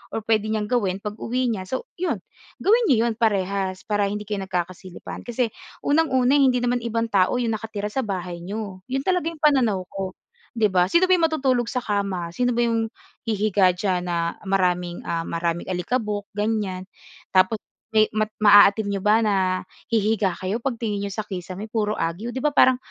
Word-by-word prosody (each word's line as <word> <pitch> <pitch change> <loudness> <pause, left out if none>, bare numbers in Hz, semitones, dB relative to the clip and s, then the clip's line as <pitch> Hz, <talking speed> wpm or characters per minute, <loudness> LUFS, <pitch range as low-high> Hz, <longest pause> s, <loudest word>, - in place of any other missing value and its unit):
or 220 - -3
puwede 215 -1 +1
niyang 215 0 -2
gawin 195 -6 0
pag-uwi 235 +4 -2
niya, 190 -4 -4
so 260 +7 -3 0.2
'yon 365 - -1 0.4
gawin 455 +5 +4
n'yo 235 -6 +4
'yon 235 -1 +1
parehas 195 -3 0
para 205 -1 0
hindi 210 +1 -3
kayo 205 -1 -3
nagkakasilipan. 180 +2 -5
Kasi 240 -1 0 0.3
unang-una, 285 -3 +3
hindi 255 -3 +3
naman 245 0 +1
ibang 230 -1 -2
tao 190 +4 +3
yung 240 -2 0
nakatira 215 -1 -4
sa 265 - -2
bahay 180 -6 -3
n'yo. 195 +1 -6
'Yon 270 +1 -2
talaga 360 -3 +1
yung 325 - -13
pananaw 255 -10 +3
ko, 190 -1 -5 0.4
'di 225 -2 +3
ba? 180 -1 +3
Sino 340 - +3
ba 370 - +6
yung 335 - +3
matutulog 265 -6 +1
sa 250 +2 -2
kama? 200 -6 -2
Sino 245 +8 0
ba 240 - +1
yung 225 -1 0 0.4
hihiga 205 -4 +3
diyan 180 -1 -1
na, 170 -1 -1
maraming, 180 -2 0
ah, 165 0 -1
maraming 170 0 -2
alikabok, 205 +2 -2
ganyan. 205 -4 -1 0.5
Tapos 185 +3 +4 0.3
may 215 -1 +4
mat 215 0 0
maaatim 205 0 +7
n'yo 195 - -2
ba 210 +3 +4
na 205 -2 +2 0.5
hihiga 215 -4 +1
kayo, 200 +5 -3
pagtingin 230 -6 -2
n'yo 200 0 -3
sa 215 0 -4
kisame, 185 0 -6
puro 215 -2 0
agiw, 170 +8 -2
'di 260 - -4
ba, 300 -1 +2
parang, 260 -2 +5
210 Hz, 180 wpm, -23 LUFS, 190-240 Hz, 0.5 s, maaatim